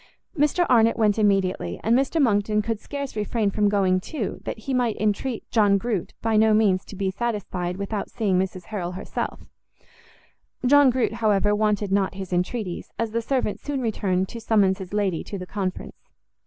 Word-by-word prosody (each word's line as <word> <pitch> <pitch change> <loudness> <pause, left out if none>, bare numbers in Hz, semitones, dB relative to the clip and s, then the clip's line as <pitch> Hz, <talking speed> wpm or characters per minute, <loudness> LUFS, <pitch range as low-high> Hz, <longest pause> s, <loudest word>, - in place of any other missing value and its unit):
Mr 300 +4 +2
Arnott 230 -2 +4
went 215 -1 +2
immediately, 190 - +1
and 225 +2 +3
Mr 275 +5 +1
Monckton 210 -4 +2
could 225 -1 -2
scarce 280 +1 -6
refrain 210 0 0
from 205 0 +2
going 190 -2 +2
too, 220 +2 -5
that - - -4
he 240 +5 -4
might 245 -3 +1
entreat 215 +3 -1
John 205 -4 +4
Groot 210 -3 -3
by 225 -1 +2
no 220 0 +5
means 195 -4 +3
to - - -10
be 195 0 -1
satisfied 190 -5 -3
without 200 +1 -3
seeing 200 -6 0
Mrs 185 -1 -3
Harrel 180 -2 -4
herself: 185 - -4 1.2
John 285 +1 +6
Groot, 250 -2 0
however, 210 -2 +2
wanted 210 -1 0
not 195 -1 +1
his 190 -2 -6
entreaties, 180 +1 -2
as 230 -1 -2
the 230 +1 -1
servant 250 -3 -1
soon 285 -2 -3
returned 195 -6 0
to 230 - -8
summons 205 -4 +2
his 185 -2 -8
lady 200 -5 0
to 200 - -6
the 180 - -6
conference. 185 -1 -5
210 Hz, 180 wpm, -24 LUFS, 190-230 Hz, 1.2 s, John